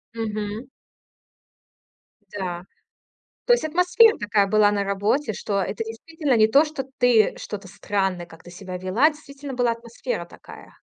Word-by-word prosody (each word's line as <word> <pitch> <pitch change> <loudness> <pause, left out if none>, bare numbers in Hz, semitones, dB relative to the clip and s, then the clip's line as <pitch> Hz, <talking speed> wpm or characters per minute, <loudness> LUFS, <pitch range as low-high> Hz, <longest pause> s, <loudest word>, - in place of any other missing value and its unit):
Мгм. 215 +2 -4 1.7
Да. 180 -2 -4 0.8
То 485 - +5
есть 475 - +1
атмосфера 360 +8 +4
такая 205 -1 +1
была 210 0 +4
на 200 -1 0
работе, 205 +5 0
что 200 0 -2
это 200 +5 -3
действительно 265 +4 -2
не 215 - +5
то, 280 +7 +5
что 300 -4 -5
ты 240 -4 +4
что-то 200 -2 -7
странное 190 -2 -2
как-то 170 +1 -15
себя 185 0 -7
вела, 195 - +3
действительно 285 -2 -10
была 245 -1 +1
атмосфера 235 - -5
такая. - - -14
220 Hz, 140 wpm, -23 LUFS, 200-280 Hz, 1.7 s, То